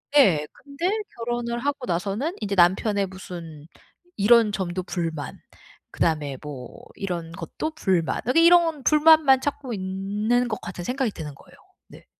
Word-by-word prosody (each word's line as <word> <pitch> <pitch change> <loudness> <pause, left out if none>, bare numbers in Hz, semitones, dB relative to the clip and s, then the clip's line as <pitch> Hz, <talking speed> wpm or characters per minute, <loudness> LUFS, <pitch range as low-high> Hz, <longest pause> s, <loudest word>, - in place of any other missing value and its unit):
예. 180 - +5 0.2
근데 285 +6 -2 0.3
결혼을 235 0 -3
하고 280 -1 -2
나서는 200 - -2
인제 200 -2 -2
남편의 195 +3 +3
무슨 170 -5 -10 0.5
이런 225 +1 +5
점도 185 -2 -3
불만, 165 -6 -4 0.5
그다음에 150 -5 -1
뭐 140 -5 -9 0.2
이런 175 -4 -4
것도 170 - -5
불만, 180 -4 0
아니 330 +8 +4
이런 335 -4 +4
불만만 305 -3 +5
찾고 275 -3 -3
있는 205 +5 -1
것 215 -2 -4
같은 180 0 -7
생각이 250 +3 -1
드는 150 -6 -8
거예요. - - -19 0.3
네. - - -16
200 Hz, 285 characters per minute, -24 LUFS, 175-260 Hz, 0.5 s, 예